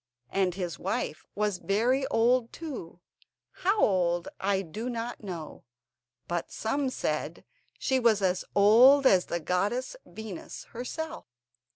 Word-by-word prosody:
And 190 Hz, -2 st, +1 dB
his 180 Hz, -3 st, -4 dB
wife 155 Hz, -, -3 dB
was 210 Hz, -3 st, 0 dB
very 245 Hz, +8 st, +1 dB
old 235 Hz, +1 st, +2 dB
too—how 305 Hz, -, -5 dB
old 175 Hz, -, +2 dB
I 195 Hz, 0 st, +1 dB
do 215 Hz, +9 st, -5 dB
not 235 Hz, -1 st, -5 dB
know; 170 Hz, -6 st, -7 dB, 0.6 s
but 175 Hz, -1 st, -3 dB
some 270 Hz, +5 st, -1 dB
said -, -, -3 dB, 0.3 s
she 265 Hz, -2 st, +1 dB
was 230 Hz, -4 st, +4 dB
as 185 Hz, -1 st, +1 dB
old 245 Hz, +8 st, +7 dB
as 185 Hz, -7 st, +5 dB
the 170 Hz, -, -2 dB
goddess 200 Hz, -, -1 dB
Venus 220 Hz, -5 st, -8 dB
herself. 320 Hz, +7 st, -5 dB
215 Hz, 120 wpm, -28 LUFS, 180-255 Hz, 0.6 s, old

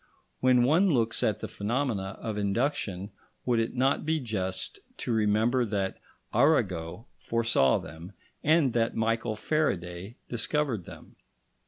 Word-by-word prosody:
When 125 Hz, -1 st, +4 dB
one 165 Hz, +10 st, +4 dB
looks 115 Hz, -7 st, +2 dB
at 105 Hz, -1 st, 0 dB
the -, -, -3 dB
phenomena 105 Hz, -3 st, -2 dB
of 110 Hz, -2 st, -4 dB
induction, 100 Hz, -2 st, -1 dB, 0.3 s
would 120 Hz, -2 st, +2 dB
it 115 Hz, +2 st, -1 dB
not 135 Hz, +2 st, +2 dB
be 160 Hz, +1 st, +1 dB
just 95 Hz, -7 st, -3 dB, 0.2 s
to 120 Hz, -, -2 dB
remember 110 Hz, +3 st, +2 dB
that 100 Hz, -4 st, -2 dB, 0.3 s
Arago 105 Hz, -, +1 dB
foresaw 115 Hz, -, +2 dB
them, 80 Hz, +4 st, -9 dB, 0.3 s
and 150 Hz, -5 st, +4 dB
that 115 Hz, -1 st, +1 dB
Michael 115 Hz, 0 st, 0 dB
Faraday 100 Hz, -, -2 dB
discovered 120 Hz, -, -1 dB
them? -, -, -13 dB
115 Hz, 130 wpm, -28 LUFS, 100-130 Hz, 0.3 s, When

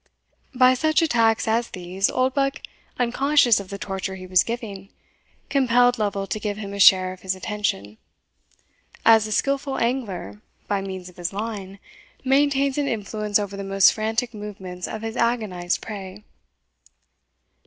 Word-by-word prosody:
By 255 Hz, 0 st, +6 dB
such 310 Hz, +5 st, +2 dB
attacks 230 Hz, -7 st, +2 dB
as 230 Hz, +1 st, +1 dB
these, 185 Hz, +2 st, -2 dB
Oldbuck, 270 Hz, +2 st, 0 dB, 0.3 s
unconscious 250 Hz, -1 st, +3 dB
of 195 Hz, -2 st, -9 dB
the 200 Hz, -, -5 dB
torture 190 Hz, -1 st, -4 dB
he 185 Hz, -1 st, -9 dB
was 185 Hz, -1 st, +4 dB
giving, 210 Hz, -5 st, -5 dB, 0.6 s
compelled 245 Hz, -2 st, +3 dB
Lovel 200 Hz, -2 st, -1 dB
to 195 Hz, +2 st, -4 dB
give 210 Hz, -1 st, -3 dB
him 200 Hz, -2 st, -6 dB
a 200 Hz, -, -6 dB
share 185 Hz, -1 st, +6 dB
of 185 Hz, -, -15 dB
his 190 Hz, 0 st, -2 dB
attention, 185 Hz, -, -3 dB, 1.1 s
as 225 Hz, -1 st, +6 dB
a -, -, -7 dB
skilful 275 Hz, +3 st, 0 dB
angler, 205 Hz, -, -3 dB, 0.3 s
by 200 Hz, -1 st, 0 dB
means 190 Hz, -2 st, -6 dB
of 180 Hz, -, -15 dB
his 175 Hz, 0 st, -3 dB
line, 200 Hz, -2 st, -5 dB, 0.5 s
maintains 275 Hz, +1 st, +2 dB
an 285 Hz, -, 0 dB
influence 210 Hz, -2 st, -1 dB
over 200 Hz, -1 st, -4 dB
the 200 Hz, -, -5 dB
most 195 Hz, 0 st, +4 dB
frantic 225 Hz, +2 st, -2 dB
movements 190 Hz, -4 st, -7 dB
of 220 Hz, 0 st, -6 dB
his 225 Hz, 0 st, -4 dB
agonized 215 Hz, -7 st, -1 dB
prey. 200 Hz, -1 st, -8 dB
210 Hz, 150 wpm, -23 LUFS, 190-245 Hz, 1.1 s, By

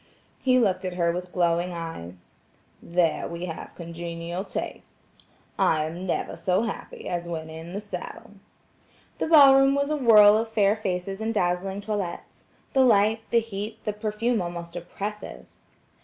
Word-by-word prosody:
He 255 Hz, -1 st, +3 dB
looked 195 Hz, -6 st, +2 dB
at 185 Hz, -1 st, -4 dB
her 170 Hz, -1 st, +2 dB
with 180 Hz, +1 st, -5 dB
glowing 175 Hz, 0 st, +1 dB
eyes: 95 Hz, -, -8 dB, 0.5 s
"There 170 Hz, -1 st, 0 dB
we 170 Hz, +1 st, -5 dB
have 165 Hz, -2 st, -7 dB
congenial 170 Hz, +1 st, -5 dB
tastes. -, -, -8 dB, 0.4 s
I 155 Hz, -1 st, +3 dB
am 170 Hz, +4 st, -6 dB
never -, -, -2 dB
so 185 Hz, +4 st, +1 dB
happy 225 Hz, -, -6 dB
as 175 Hz, -1 st, -3 dB
when 160 Hz, -2 st, -5 dB
in 165 Hz, +2 st, -9 dB
the 200 Hz, -, -3 dB
saddle." 210 Hz, -1 st, -8 dB, 0.9 s
The -, -, 0 dB
ball 285 Hz, -4 st, +8 dB
room 270 Hz, 0 st, +4 dB
was 280 Hz, +1 st, 0 dB
a -, -, +2 dB
whirl 215 Hz, -6 st, +7 dB
of 225 Hz, -, -2 dB
fair 210 Hz, -2 st, +2 dB
faces 195 Hz, -1 st, -3 dB
and 220 Hz, +1 st, -1 dB
dazzling 190 Hz, -1 st, -1 dB
toilets–the 205 Hz, +5 st, -4 dB
light, 220 Hz, -2 st, +4 dB
the 235 Hz, -, +3 dB
heat, 215 Hz, 0 st, -6 dB
the 210 Hz, -, -1 dB
perfume 215 Hz, +2 st, -1 dB
almost 170 Hz, -1 st, -6 dB
oppressive. 205 Hz, +4 st, -6 dB
190 Hz, 155 wpm, -25 LUFS, 170-220 Hz, 0.9 s, ball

